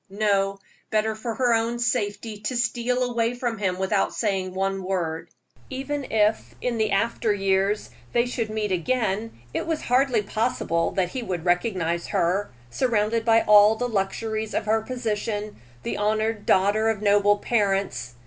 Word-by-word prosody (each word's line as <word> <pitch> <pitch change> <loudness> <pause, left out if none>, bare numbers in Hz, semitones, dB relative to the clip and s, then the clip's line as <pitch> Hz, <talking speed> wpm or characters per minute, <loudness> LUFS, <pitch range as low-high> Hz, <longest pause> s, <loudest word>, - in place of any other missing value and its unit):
No; 200 -1 +1 0.3
better 220 0 +1
for 220 +1 -5
her 245 0 +2
own 230 +1 +1
safety 225 -2 -1
to 240 +4 -3
steal 240 +1 0
away 235 -1 0
from 240 -3 -3
him 185 -3 0
without 190 +1 0
saying 190 -4 -1
one 195 0 -1
word. 175 -4 -3 0.4
Even 275 +2 -3
if, 215 0 +1
in 240 -2 -2
the 215 -1 +2
after 220 +2 +1
years, 195 +1 0 0.2
they 240 0 +2
should 240 -3 -3
meet 215 -2 -2
again, 215 +3 0 0.2
it - - -2
was 320 -2 -2
hardly 250 -3 +2
possible 205 -6 0
that 185 -3 -1
he 260 - -4
would 180 -6 -4
recognize 175 -2 0
her, 190 +4 0 0.2
surrounded 225 - +1
by 225 0 +4
all 210 +1 +7
the 245 +2 -2
luxuries 220 +1 -2
of - - -1
her 220 +1 +2
position, 215 -3 -3 0.3
the - - -3
honored 215 +1 0
daughter 205 +4 +3
of 215 -2 -2
noble 205 0 +4
parents. 195 - -1
215 Hz, 160 wpm, -24 LUFS, 195-230 Hz, 0.4 s, all